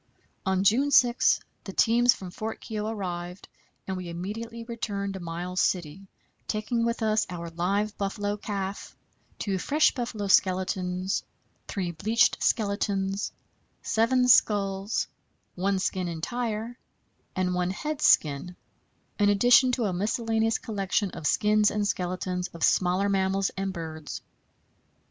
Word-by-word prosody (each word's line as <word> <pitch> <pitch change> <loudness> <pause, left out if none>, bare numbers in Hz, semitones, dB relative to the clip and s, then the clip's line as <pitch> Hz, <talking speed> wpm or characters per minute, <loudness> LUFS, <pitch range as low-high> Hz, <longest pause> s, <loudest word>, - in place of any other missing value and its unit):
On 190 0 +2
June 245 +8 +4
6 245 -3 +4 0.2
the 195 - -7
teams 240 +4 +4
from 185 -2 -8
Fort 220 +4 -5
Keogh 215 -2 -4
arrived, 180 -4 -5 0.4
and 190 - -3
we 180 -2 -6
immediately 225 +7 -5
returned 205 -4 -4
to 190 - -6
Miles 175 +2 -3
City, 180 +2 -1 0.4
taking 230 +2 -1
with 235 0 -1
us 215 0 +2
our 170 -2 -6
live 200 +5 -1
buffalo 205 +1 -1
calf, 200 -1 -5 0.4
two 195 -3 -2
fresh 305 - +3
buffalo 235 -5 -3
skeletons, 185 -1 +1 0.4
three 185 -4 -2
bleached 220 +9 +2
skeletons, 200 -2 0 0.5
seven 250 +3 +2
skulls, 200 -3 +3 0.5
one 195 +2 0
skin 185 -1 -1
entire, 225 +7 -3 0.6
and 185 -1 0
one 180 0 0
head 300 +10 -4
skin, 150 - +3 0.6
in 205 0 +4
addition 245 +5 +5
to 240 -2 0
a 190 - 0
miscellaneous 225 +3 0
collection 200 -2 -1
of 150 - -3
skins 210 0 +3
and 210 -1 -1
skeletons 180 -1 -2
of 165 - -5
smaller 185 +2 +3
mammals 195 0 +1
and 195 0 -2
birds. 160 -3 -7
200 Hz, 130 wpm, -27 LUFS, 185-225 Hz, 0.6 s, addition